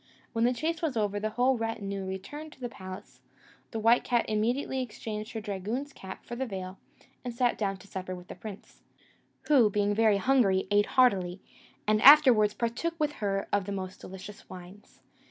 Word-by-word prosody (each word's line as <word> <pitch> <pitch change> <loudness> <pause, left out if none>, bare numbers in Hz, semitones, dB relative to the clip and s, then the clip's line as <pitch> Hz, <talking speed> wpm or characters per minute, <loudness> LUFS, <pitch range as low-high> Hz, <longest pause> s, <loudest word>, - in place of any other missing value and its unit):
When 230 0 +2
the 245 - +3
chase 315 +5 -2
was 300 -8 -1
over, 205 -1 0
the 215 +1 -1
whole 245 +3 +2
retinue 200 -4 -3
returned 290 +12 -7
to - - -22
the 245 -2 -4
palace; 185 -4 -10 0.5
the 225 - -5
white 230 +2 +4
cat 240 -1 +1
immediately 240 +5 0
exchanged 215 -2 -6
her 220 - -4
dragoon's 215 +8 -4
cap 190 - -10
for 240 - -6
the 265 +2 -3
veil, 190 -2 -6 0.4
and 245 - -4
sat 240 +1 +1
down 195 -2 -2
to 200 - -16
supper 185 -1 -5
with 180 0 -12
the - - -7
prince, 205 +1 -11 0.6
who, 260 -8 +5
being 205 0 +1
very 215 -1 +4
hungry, 200 -5 +3
ate 205 0 +4
heartily, 190 -8 +3 0.5
and 215 0 +2
afterwards 255 -8 +8
partook 245 +9 -2
with 300 -1 +1
her 195 -1 -1
of 200 -2 +2
the 200 - -5
most 190 -1 -5
delicious 190 +2 -10
wines. 185 +2 -13
215 Hz, 185 wpm, -29 LUFS, 195-245 Hz, 0.6 s, afterwards